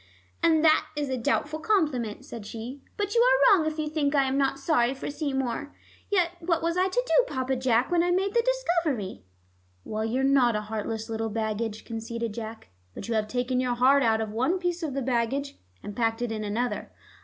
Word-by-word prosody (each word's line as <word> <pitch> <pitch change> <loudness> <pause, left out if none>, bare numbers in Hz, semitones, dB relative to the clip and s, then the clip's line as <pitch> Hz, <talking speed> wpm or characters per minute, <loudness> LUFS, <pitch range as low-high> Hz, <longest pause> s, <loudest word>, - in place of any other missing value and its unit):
"And 325 -1 +4
that 315 0 +5
is 290 -2 -2
a 260 - 0
doubtful 295 +5 0
compliment," 295 - 0
said 230 -3 -8
she. 235 +6 -7 0.2
"But 410 -1 -1
you 470 - +4
are - - +6
wrong 320 -4 0
if 310 0 -3
you 310 -1 -1
think 300 -1 0
I 275 - +5
am 265 0 0
not 275 -1 +1
sorry 275 -3 +1
for 270 - -5
Seymour. 280 -1 -3 0.3
Yet 360 -5 +2
what 335 -1 0
was 335 0 0
I 370 +1 +3
to - - 0
do, - - +4
Papa 260 0 -1
Jack, 250 +1 +1
when 345 -1 +4
I 350 - +1
made 385 +2 +1
The 470 - +4
Discovery?" 340 - -1 0.6
"Well, 215 0 -3
you're 245 +4 0
not 265 -4 +4
a 210 - 0
heartless 220 +1 -4
little 225 -1 -2
baggage," 220 0 -3
conceded 230 -1 -4
Jack, 220 0 -7 0.3
"but - - -7
you 235 - -1
have 215 -1 0
taken 250 +2 -1
your 250 -1 0
heart 265 +3 +5
out 225 -3 +2
of 215 -1 -3
one 260 - +1
piece 355 -1 -2
of 300 -5 -3
the 275 - -1
baggage, 260 +3 -1 0.3
and 205 - -7
packed 225 0 0
it 240 - -2
in 215 -1 -3
another." 210 +2 -2
265 Hz, 210 wpm, -27 LUFS, 225-315 Hz, 0.6 s, are